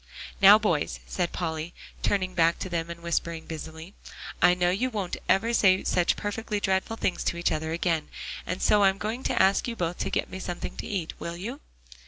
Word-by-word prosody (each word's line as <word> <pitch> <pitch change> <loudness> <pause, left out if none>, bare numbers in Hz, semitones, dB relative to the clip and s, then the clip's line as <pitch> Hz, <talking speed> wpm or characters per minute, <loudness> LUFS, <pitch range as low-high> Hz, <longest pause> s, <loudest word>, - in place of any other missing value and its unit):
"Now, 200 +2 +10
boys," 175 -9 0
said 175 -2 -2
Polly, 160 -1 -4 0.3
turning 185 -2 0
back 170 -1 +3
to 185 - -5
them 170 -1 -2
and 170 0 -8
whispering 170 -1 -2
busily, 160 +3 -8 0.5
"I 180 0 +6
know 180 0 +2
you 235 +8 0
won't 205 -7 -3
ever 230 +5 +3
say 190 -4 +4
such 180 -1 +2
perfectly 210 0 -3
dreadful 190 +2 0
things 185 - -1
to 170 - 0
each 170 - +1
other 160 0 -2
again. 165 -2 0 0.4
And 180 +1 -3
so 210 - +5
I'm 195 -1 +4
going 220 +5 -3
to - - +1
ask 195 +4 +3
you 235 - -3
both 175 -3 -2
to - - -1
get - - -1
me 185 - -7
something 175 -2 -5
to - - -5
eat, 185 -6 -3
will 170 0 -5
you?" 235 +10 -6
180 Hz, 205 wpm, -27 LUFS, 170-200 Hz, 0.5 s, Now